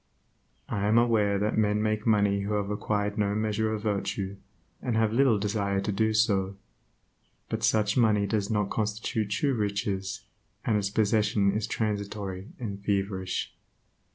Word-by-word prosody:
I 100 Hz, 0 st, -1 dB
am 110 Hz, +2 st, +4 dB
aware 110 Hz, -4 st, +3 dB
that 105 Hz, +2 st, 0 dB
men 105 Hz, -1 st, +2 dB
make 110 Hz, +1 st, -1 dB
money 100 Hz, -2 st, +3 dB
who 100 Hz, +2 st, -2 dB
have 100 Hz, 0 st, -1 dB
acquired 105 Hz, 0 st, -1 dB
no 100 Hz, -1 st, +1 dB
measure 110 Hz, 0 st, 0 dB
of 110 Hz, -1 st, -3 dB
virtue, 100 Hz, -2 st, -2 dB, 0.4 s
and 120 Hz, -3 st, -1 dB
have 110 Hz, -1 st, +2 dB
little 125 Hz, -3 st, +4 dB
desire 100 Hz, -1 st, 0 dB
to 100 Hz, +2 st, -1 dB
do 110 Hz, +2 st, +1 dB
so; 100 Hz, -3 st, +2 dB, 0.9 s
but 110 Hz, 0 st, -3 dB
such 105 Hz, 0 st, +2 dB
money 105 Hz, -4 st, +4 dB
does 100 Hz, -1 st, -1 dB
not 105 Hz, -3 st, 0 dB
constitute 105 Hz, 0 st, -1 dB
true 135 Hz, +7 st, +1 dB
riches, 100 Hz, -3 st, -2 dB, 0.4 s
and 110 Hz, -, +2 dB
its 100 Hz, -1 st, +1 dB
possession 105 Hz, -1 st, +2 dB
is 105 Hz, +2 st, -2 dB
transitory 100 Hz, -3 st, -3 dB
and 100 Hz, -5 st, -5 dB
feverish. 95 Hz, -2 st, -1 dB
105 Hz, 155 wpm, -28 LUFS, 100-110 Hz, 0.9 s, am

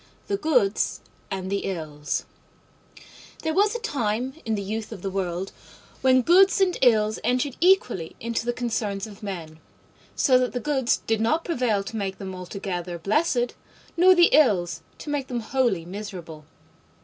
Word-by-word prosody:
THE 400 Hz, -, -1 dB
GOODS 250 Hz, -, +1 dB, 0.3 s
AND 190 Hz, -1 st, -4 dB
THE 200 Hz, -, -1 dB
ILLS 155 Hz, -5 st, -3 dB, 1.2 s
There 320 Hz, 0 st, 0 dB
was 415 Hz, +5 st, +3 dB
a -, -, -2 dB
time 255 Hz, -, -1 dB
in 220 Hz, -1 st, 0 dB
the 200 Hz, -, -3 dB
youth 215 Hz, +3 st, -4 dB
of 195 Hz, -5 st, -8 dB
the 195 Hz, -, -2 dB
world 185 Hz, -1 st, -3 dB, 0.5 s
when 260 Hz, -1 st, +4 dB
Goods 380 Hz, +6 st, +5 dB
and 375 Hz, -2 st, +3 dB
Ills 215 Hz, -4 st, +3 dB
entered 250 Hz, +2 st, 0 dB
equally 295 Hz, -, +2 dB
into 230 Hz, 0 st, -2 dB
the -, -, +3 dB
concerns 220 Hz, -5 st, -2 dB
of 210 Hz, -1 st, -12 dB
men, 170 Hz, -6 st, -6 dB, 0.6 s
so 255 Hz, -3 st, +4 dB
that 250 Hz, -1 st, -1 dB
the 250 Hz, -, -1 dB
Goods 265 Hz, -1 st, 0 dB
did 225 Hz, -1 st, 0 dB
not 310 Hz, +9 st, +1 dB
prevail 245 Hz, -, 0 dB
to 210 Hz, -, -7 dB
make 195 Hz, -2 st, -3 dB
them 190 Hz, -1 st, -6 dB
altogether 180 Hz, -1 st, -5 dB
blessed, 240 Hz, -, +1 dB, 0.4 s
nor 370 Hz, +2 st, +6 dB
the 345 Hz, -1 st, +6 dB
Ills 175 Hz, -, +3 dB, 0.2 s
to 295 Hz, -, -6 dB
make 280 Hz, -3 st, -2 dB
them 240 Hz, -2 st, -3 dB
wholly 225 Hz, -8 st, 0 dB
miserable. 175 Hz, -5 st, -8 dB
220 Hz, 160 wpm, -25 LUFS, 190-265 Hz, 1.2 s, nor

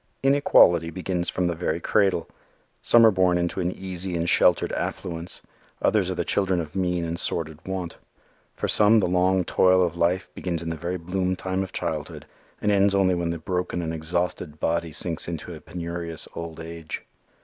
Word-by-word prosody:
Inequality 110 Hz, -, +5 dB
begins 90 Hz, 0 st, -2 dB
from 90 Hz, -, -1 dB
the 85 Hz, -, +1 dB
very 85 Hz, -1 st, -2 dB
cradle. 95 Hz, -1 st, +1 dB, 0.5 s
Some 115 Hz, -1 st, +6 dB
are 110 Hz, -, +7 dB
born 90 Hz, -2 st, +3 dB
into 85 Hz, +2 st, -1 dB
an 90 Hz, 0 st, 0 dB
easy 95 Hz, -1 st, -5 dB
and 85 Hz, 0 st, -1 dB
sheltered -, -, +4 dB
affluence. 85 Hz, 0 st, -4 dB, 0.4 s
Others 100 Hz, -4 st, +2 dB
are 95 Hz, -, -2 dB
the 85 Hz, -1 st, -2 dB
children 95 Hz, -3 st, +1 dB
of 80 Hz, -3 st, -6 dB
mean 90 Hz, -2 st, 0 dB
and 85 Hz, +1 st, -3 dB
sordid 80 Hz, -2 st, -1 dB
want. 95 Hz, -3 st, -4 dB, 0.6 s
For -, -, -2 dB
some 110 Hz, +1 st, +5 dB
the 100 Hz, -, +2 dB
long 90 Hz, +1 st, +2 dB
toil 95 Hz, +1 st, +4 dB
of 85 Hz, -, -3 dB
life 85 Hz, +2 st, 0 dB
begins 85 Hz, -2 st, -3 dB
in 85 Hz, -, -4 dB
the 80 Hz, -, -2 dB
very 85 Hz, +3 st, -3 dB
bloom 90 Hz, +2 st, -1 dB
time 95 Hz, +1 st, -2 dB
of 95 Hz, -1 st, -4 dB
childhood 80 Hz, -2 st, -4 dB, 0.4 s
and 105 Hz, -, +3 dB
ends 100 Hz, 0 st, +3 dB
only 95 Hz, -2 st, +3 dB
when 85 Hz, -1 st, -1 dB
the 85 Hz, -, -2 dB
broken 90 Hz, +1 st, -2 dB
and 80 Hz, 0 st, -3 dB
exhausted 80 Hz, -1 st, -2 dB
body 85 Hz, 0 st, -1 dB
sinks 80 Hz, +1 st, -1 dB
into 85 Hz, +1 st, -5 dB
a 80 Hz, -, -10 dB
penurious 85 Hz, -1 st, -6 dB
old 85 Hz, -1 st, -7 dB
age. 80 Hz, -1 st, -7 dB
90 Hz, 185 wpm, -25 LUFS, 85-95 Hz, 0.6 s, are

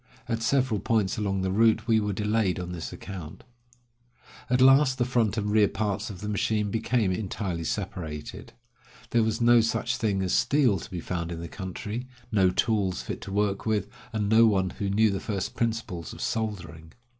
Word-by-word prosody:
At 115 Hz, 0 st, -2 dB
several 125 Hz, -2 st, +1 dB
points 110 Hz, -2 st, 0 dB
along 95 Hz, -2 st, -1 dB
the 95 Hz, -, 0 dB
route 110 Hz, +2 st, +3 dB
we 110 Hz, -2 st, +4 dB
were 105 Hz, -1 st, -1 dB
delayed 105 Hz, -1 st, 0 dB
on 90 Hz, 0 st, -5 dB
this 85 Hz, -2 st, -5 dB
account. 85 Hz, -5 st, -8 dB, 1.1 s
At 125 Hz, -, +2 dB
last 135 Hz, 0 st, +6 dB
the 120 Hz, -, +1 dB
front 115 Hz, -4 st, +1 dB
and 105 Hz, -1 st, -1 dB
rear 105 Hz, -1 st, +5 dB
parts 105 Hz, +1 st, -2 dB
of 95 Hz, -4 st, -8 dB
the 105 Hz, -, -4 dB
machine 105 Hz, 0 st, 0 dB
became 115 Hz, -2 st, +1 dB
entirely 95 Hz, -3 st, -3 dB
separated. 80 Hz, -5 st, -5 dB, 0.6 s
There 120 Hz, -, +3 dB
was 110 Hz, +1 st, 0 dB
no 120 Hz, 0 st, +6 dB
such 120 Hz, +3 st, -1 dB
thing 105 Hz, -6 st, 0 dB
as 90 Hz, -, -1 dB
steel 130 Hz, -9 st, +3 dB
to -, -, -9 dB
be 90 Hz, -2 st, -5 dB
found 85 Hz, -1 st, -3 dB
in 85 Hz, -, -5 dB
the 85 Hz, -, -6 dB
country, 105 Hz, +7 st, -6 dB, 0.2 s
no 95 Hz, -4 st, +4 dB
tools 100 Hz, -2 st, 0 dB
fit -, -, -5 dB
to 100 Hz, -, -7 dB
work 100 Hz, +1 st, 0 dB
with, 105 Hz, -3 st, +1 dB, 0.2 s
and 105 Hz, -3 st, -1 dB
no 110 Hz, +2 st, +6 dB
one 95 Hz, -4 st, +1 dB
who 100 Hz, -, -3 dB
knew 110 Hz, +2 st, +3 dB
the 95 Hz, -, -2 dB
first 100 Hz, -2 st, -3 dB
principles 110 Hz, -8 st, -3 dB
of -, -, -9 dB
soldering. 95 Hz, -7 st, -4 dB
105 Hz, 190 wpm, -27 LUFS, 95-115 Hz, 1.1 s, last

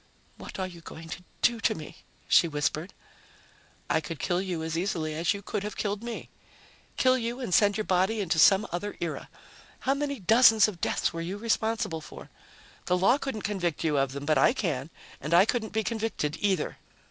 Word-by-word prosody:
"What -, -, -8 dB
are 190 Hz, -, -1 dB
you 175 Hz, -2 st, -10 dB
going 165 Hz, 0 st, -10 dB
to 180 Hz, -, -7 dB, 0.2 s
do 240 Hz, -1 st, +3 dB
to 220 Hz, 0 st, +1 dB
me?" 155 Hz, -2 st, -9 dB, 0.3 s
she 170 Hz, -, +5 dB
whispered. 155 Hz, +3 st, -2 dB, 1.0 s
"I 160 Hz, -, +1 dB
could 160 Hz, +1 st, -6 dB
kill 175 Hz, +6 st, 0 dB
you 180 Hz, -4 st, -3 dB
as 160 Hz, 0 st, -3 dB
easily 165 Hz, -3 st, -1 dB
as 165 Hz, +2 st, +1 dB
you 200 Hz, -, -8 dB
could 210 Hz, +1 st, -3 dB
have 210 Hz, +1 st, -5 dB
killed 205 Hz, 0 st, -2 dB
me. 235 Hz, -1 st, -6 dB, 0.7 s
Kill 255 Hz, 0 st, +4 dB
you 235 Hz, +2 st, -3 dB
and 240 Hz, -8 st, -3 dB
send 205 Hz, +1 st, +4 dB
your 215 Hz, -, -1 dB
body 190 Hz, +3 st, +1 dB
into 170 Hz, -5 st, 0 dB
some 195 Hz, +5 st, +6 dB
other 205 Hz, +4 st, -4 dB
era. 170 Hz, -2 st, -4 dB, 0.5 s
How 270 Hz, -, +2 dB
many 280 Hz, -1 st, -3 dB
dozens 220 Hz, +2 st, +6 dB
of 190 Hz, -5 st, -7 dB
deaths -, -, 0 dB
were 165 Hz, -, -4 dB
you 180 Hz, +4 st, -4 dB
responsible 220 Hz, -6 st, -1 dB
for? -, -, -12 dB, 0.6 s
The 180 Hz, -, +3 dB
law 220 Hz, +10 st, +4 dB
couldn't 265 Hz, -8 st, -4 dB
convict 180 Hz, -6 st, -2 dB
you 155 Hz, -3 st, +1 dB
of 135 Hz, -1 st, 0 dB
them, 140 Hz, 0 st, -6 dB
but 155 Hz, -2 st, +3 dB
I 225 Hz, -, +5 dB
can. 160 Hz, -, -2 dB, 0.3 s
And 155 Hz, +3 st, +1 dB
I 180 Hz, +3 st, +7 dB
couldn't 225 Hz, -1 st, -1 dB
be 220 Hz, +1 st, 0 dB
convicted, 220 Hz, -10 st, -2 dB
either." 190 Hz, -6 st, 0 dB
190 Hz, 200 wpm, -28 LUFS, 165-220 Hz, 1.0 s, I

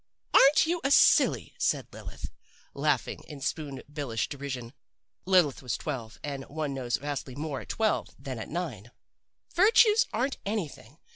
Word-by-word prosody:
"'Aren't 300 Hz, +4 st, +7 dB
you 340 Hz, +1 st, -1 dB
a 275 Hz, -, +2 dB
silly!' -, -, +4 dB
said -, -, +1 dB
Lilith, -, -, -9 dB, 0.4 s
laughing -, -, -1 dB
in 150 Hz, -2 st, -9 dB
Spoon 140 Hz, -1 st, -4 dB
billish 140 Hz, -8 st, -3 dB
derision. 130 Hz, -4 st, -6 dB, 0.5 s
Lilith 180 Hz, -8 st, +3 dB
was 125 Hz, -6 st, -2 dB
twelve, 120 Hz, -7 st, -5 dB
and 140 Hz, -2 st, -4 dB
one 150 Hz, -1 st, -3 dB
knows 125 Hz, -4 st, -1 dB
vastly 140 Hz, -2 st, -5 dB
more 145 Hz, -2 st, -4 dB
at -, -, -14 dB
twelve 220 Hz, -1 st, 0 dB
than 130 Hz, -4 st, -6 dB
at 110 Hz, -, -7 dB
nine. 140 Hz, -, -4 dB, 0.6 s
'Virtues 440 Hz, +4 st, +5 dB
aren't 265 Hz, +2 st, -1 dB
anything. 160 Hz, -, -5 dB
145 Hz, 145 wpm, -28 LUFS, 130-195 Hz, 0.6 s, Aren't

